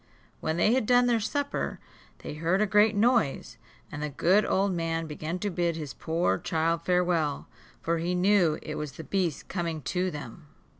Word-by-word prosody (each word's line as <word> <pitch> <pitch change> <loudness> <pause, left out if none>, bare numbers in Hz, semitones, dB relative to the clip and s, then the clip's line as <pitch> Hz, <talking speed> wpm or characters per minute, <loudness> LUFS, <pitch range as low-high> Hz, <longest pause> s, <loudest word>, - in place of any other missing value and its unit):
When 160 +1 -2
they 215 +6 +3
had 255 -4 +1
done 245 0 +5
their 240 -2 +2
supper, 285 +7 -2 0.4
they - - -5
heard 165 +5 0
a 215 - +3
great 210 +1 +4
noise, 225 - +1 0.3
and 145 - -6
the 150 - -2
good 180 +8 +3
old 195 0 +1
man 165 -1 -2
began 155 +2 -4
to 205 +2 -3
bid 170 -1 0
his 150 -4 -6
poor 160 - 0
child 165 +1 0
farewell, 175 -5 0 0.4
for 165 0 0
he 175 +2 -1
knew 180 -3 +3
it 155 - -5
was 150 -2 -5
the 160 - -8
beast 180 -4 -2
coming 165 -5 -3
to 180 +7 -1
them. 145 -3 -9
170 Hz, 185 wpm, -28 LUFS, 160-200 Hz, 0.4 s, done